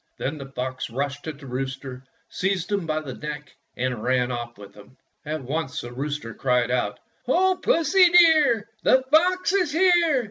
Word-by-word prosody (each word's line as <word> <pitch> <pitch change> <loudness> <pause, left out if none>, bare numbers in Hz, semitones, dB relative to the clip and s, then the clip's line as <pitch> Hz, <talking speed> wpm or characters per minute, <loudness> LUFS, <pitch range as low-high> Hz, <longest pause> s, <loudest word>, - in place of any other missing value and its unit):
Then 150 +3 -4
the 135 - -8
fox 130 -1 -5
rushed 140 +4 -4
at 155 -3 -5
the 140 - -13
rooster, 130 0 -5 0.2
seized 190 -1 -2
him 200 -5 -1
by 155 0 -1
the 135 -4 -7
neck, 150 0 -7 0.2
and 125 -2 -2
ran 125 +1 +1
oflF 120 -1 -5
with 100 -1 -13
him. 105 +5 -17 0.3
At 155 -2 -3
once 140 +1 -3
the 120 0 -9
rooster 140 -3 -4
cried 125 -1 0
out: 105 -5 -1 0.2
— - - -40
"O 370 +7 +2
Pussy, 345 +3 +4
dear, 310 - +5 0.2
The 260 0 +4
fox 365 +4 +3
is 365 -6 +1
here 360 +4 +4
145 Hz, 180 wpm, -24 LUFS, -, 0.3 s, dear